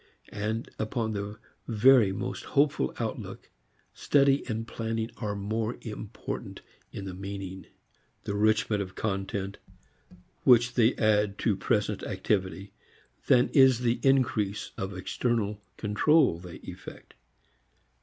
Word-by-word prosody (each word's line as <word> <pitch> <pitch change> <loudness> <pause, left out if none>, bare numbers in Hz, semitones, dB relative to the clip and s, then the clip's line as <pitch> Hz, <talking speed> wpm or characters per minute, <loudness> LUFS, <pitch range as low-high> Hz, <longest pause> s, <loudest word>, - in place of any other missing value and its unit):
And, 110 +3 -3
upon 110 0 -1
the 100 +1 -5 0.3
very 115 -2 +5
most 120 +6 -4
hopeful 140 - +1
outlook, - - -5 0.4
study 140 -1 +3
and 115 -1 -3
planning 115 0 -3
are 105 -3 -3
more 110 +3 -2
important 110 -1 -6 0.3
in 100 - -6
the 95 - -5
meaning, 95 0 -7 0.6
the - - -3
enrichment 105 0 +2
of 95 -1 -6
content, 95 -1 -3 0.8
which 120 -1 +5
they 120 0 +3
add 105 -2 +2
to 110 - +3
present 105 +1 0
activity 95 0 -2 0.5
than 125 -1 +5
is 130 -3 +5
the 120 -1 +1
increase 120 -7 +1
of 95 0 -5
external 105 +1 -1 0.2
control 105 - +3
they 90 -1 -10
effect. - - -10
110 Hz, 115 wpm, -28 LUFS, 100-120 Hz, 0.8 s, very